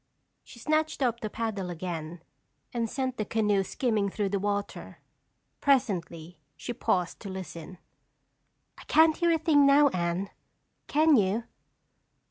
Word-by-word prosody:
She - - -15
snatched 310 +3 0
up 235 -2 0
the 215 - -4
paddle 210 -5 -3
again 170 -1 -6 0.5
and 230 -2 -1
sent 260 0 -3
the 215 - -1
canoe 210 -3 +1
skimming 215 -1 -1
through 200 0 -2
the 200 0 -1
water. 205 0 -3 0.6
Presently 180 - 0 0.2
she 240 - -5
paused 180 -6 -1
to 200 - -8
listen. 185 -2 -8 1.0
"I - - -11
can't 315 0 +4
hear 345 -1 +2
a 330 - +3
thing 310 -2 +4
now, 285 +1 +6
Anne. 175 0 -2 0.6
Can 310 +1 +4
you?" 205 +3 +1
210 Hz, 135 wpm, -28 LUFS, 185-270 Hz, 1.0 s, now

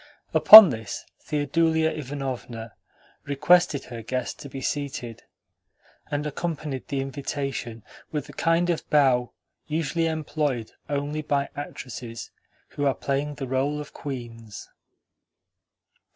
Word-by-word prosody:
Upon 215 -6 +11
this 110 -2 -6
Theodulia 160 +2 +1
Ivanovna 130 -5 -6 0.5
requested 150 +2 +3
her 120 -2 -8
guest 125 +3 -4
to 140 - -9
be 135 - -7
seated, 130 -5 -4 0.9
and 145 0 -2
accompanied 150 -3 -4
the 140 -2 -2
invitation 135 -4 -5 0.3
with 150 -3 -3
the 145 - -13
kind 165 +4 +1
of 165 - -4
bow 130 -5 +3 0.4
usually 160 +1 -1
employed 150 -6 -2 0.2
only 145 +1 -2
by 140 -2 -1
actresses 125 -4 -7 0.4
who 145 - -3
are 135 - +1
playing 140 +2 -2
the 135 - -5
role 135 +3 -1
of 150 - -9
queens. 115 -6 -8
140 Hz, 115 wpm, -25 LUFS, 130-150 Hz, 0.9 s, Upon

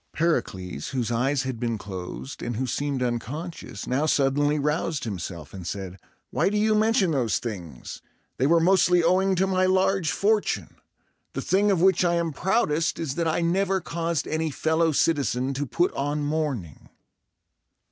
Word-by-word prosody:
Pericles, 95 - -1
whose 120 -4 -2
eyes 130 +3 +1
had 130 -3 -4
been 115 -2 -1
closed, 90 -10 -7
and 120 -1 -3
who 130 +4 -1
seemed 135 +1 -1
unconscious, 125 - -4
now 140 +5 0
suddenly 145 +1 +2
roused 150 +1 -1
himself, 90 -7 -6
and 90 -3 -7
said, 95 -2 -5 0.3
"Why - - +2
do 210 - -1
you 215 +1 +3
mention 215 -3 +3
those 125 -7 +1
things? 90 - -7 0.4
They 130 - +2
were 165 +2 +5
mostly 180 0 +4
owing 190 +3 +3
to 185 +2 +2
my 185 -1 +2
large 190 -2 +2
fortune. 210 +3 0 0.6
The - - -3
thing 200 +2 +2
of 190 -4 +2
which 190 -1 +4
I 175 -1 +2
am 170 -2 -1
proudest 165 -3 +1
is 160 -5 -3
that 165 +2 -1
I 160 +2 +1
never 190 +3 +1
caused 165 -3 -2
any 160 0 -1
fellow 160 +2 +1
citizen 140 -4 +1
to 140 +1 -3
put 175 +7 +1
on 145 +1 -1
mourning!" 145 - -3
150 Hz, 165 wpm, -25 LUFS, 125-175 Hz, 0.6 s, were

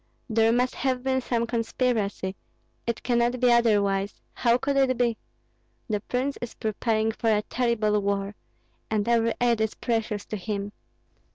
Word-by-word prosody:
There 225 -1 +3
must 250 +2 +2
have 255 -1 -1
been 260 0 +1
some 235 -2 0
conspiracy; 225 -4 -1 0.5
it 235 -1 -2
cannot 240 0 +1
be 250 0 +4
otherwise, 205 -4 +2
how 235 -1 +3
could 275 +2 -1
it 265 -2 +3
be? 240 -2 +2 0.7
The 210 -1 0
prince 255 +6 -2
is 240 - -6
preparing 220 +1 0
for 225 0 -1
a 210 -1 +2
terrible 215 -4 +1
war, 200 0 -1 0.6
and 215 -1 0
every 230 -1 +2
aid 235 -2 +2
is 220 -1 0
precious 225 -3 -2
to 215 - -4
him. 200 +1 -4
230 Hz, 155 wpm, -26 LUFS, 210-245 Hz, 0.7 s, be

